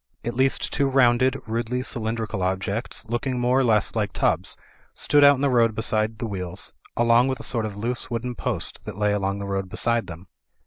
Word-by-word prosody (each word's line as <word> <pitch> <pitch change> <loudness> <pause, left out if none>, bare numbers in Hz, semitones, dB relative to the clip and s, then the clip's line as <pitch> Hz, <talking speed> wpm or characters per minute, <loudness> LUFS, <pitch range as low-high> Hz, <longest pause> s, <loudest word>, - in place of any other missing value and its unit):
At 120 - -2
least 130 +2 +1
two 140 -1 +1
rounded, 130 0 +3
rudely 120 +3 -2
cylindrical 110 -4 -3
objects, 95 +6 -2
looking 125 +2 -2
more 125 +2 +2
or - - +3
less 110 -4 +2
like 105 -4 -1
tubs, - - 0 0.4
stood 145 0 +3
out 140 0 +8
in 130 - -6
the 140 - +2
road 115 -3 +3
beside 110 0 0
the 115 - -4
wheels, 90 -3 -4 0.2
along 120 +1 +4
with 130 -1 -2
a - - -7
sort 115 -3 -1
of 105 - -8
loose 120 +4 0
wooden 120 +1 -3
post - - -3
that - - -7
lay 105 0 +1
along 100 -1 -1
the 100 - -5
road 95 -1 -3
beside 115 +4 0
them. 85 +2 -9
115 Hz, 205 wpm, -24 LUFS, 105-125 Hz, 0.4 s, out